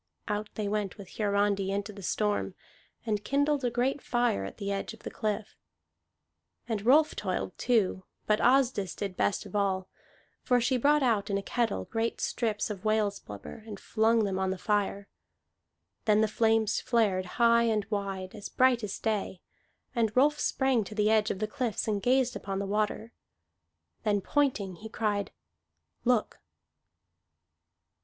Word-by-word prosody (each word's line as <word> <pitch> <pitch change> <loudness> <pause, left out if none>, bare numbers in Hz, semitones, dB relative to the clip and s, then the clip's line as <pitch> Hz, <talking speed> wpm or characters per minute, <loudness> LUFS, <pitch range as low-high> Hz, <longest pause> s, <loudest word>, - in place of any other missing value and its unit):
Out 210 0 -2
they 210 -2 -2
went 210 0 -2
with 195 -3 -12
Hiarandi 200 -2 +1
into 200 +1 -3
the 200 - -10
storm, 210 +2 -1 0.5
and 210 -2 -1
kindled 285 +3 +1
a 245 - +2
great 255 +4 0
fire 240 - +1
at 95 - -8
the 200 0 -3
edge 200 +3 -3
of 225 - -22
the - - -5
cliff. 215 -1 -3 1.1
And 220 -4 -2
Rolf 300 +4 +5
toiled 185 -2 -3
too; 210 -6 +1 0.2
but 210 0 +2
Asdis 250 -6 +3
did 195 -3 -4
best 200 - 0
of - - -9
all, 190 -2 0 0.5
for 250 -1 +3
she 255 +2 +1
brought 290 +3 +3
out 215 -4 +1
in 200 - +1
a 200 - -4
kettle 220 - -1
great 225 +1 -2
strips 215 -3 -1
of 200 -2 -7
whale's 215 -2 +1
blubber, 105 - -9
and 205 -3 -7
flung 225 0 +2
them 195 -2 -1
on 190 0 0
the 190 - -2
fire. 200 0 -1 1.0
Then 215 0 +4
the 220 - +3
flames 220 0 +2
flared 205 -6 +1
high 235 -1 +5
and 215 -3 +1
wide, 195 -2 -3
as 210 -2 -7
bright 255 -2 +3
as 205 - -3
day. 210 -4 -2 0.5
And 225 -2 0
Rolf 295 +3 +4
sprang 265 -4 +1
to 210 - -9
the 210 0 +3
edge 215 -1 +3
of - - -2
the 215 - -1
cliffs 235 -1 -2
and 205 -2 0
gazed 255 +1 +2
upon 195 -1 -4
the 200 - -2
water. 215 +3 -1 0.9
Then, 210 -2 +1
pointing, 205 -8 0
he 220 +4 -9
cried, 210 -2 -1 0.7
"Look!" 245 -3 +1
215 Hz, 165 wpm, -29 LUFS, 200-235 Hz, 1.1 s, Rolf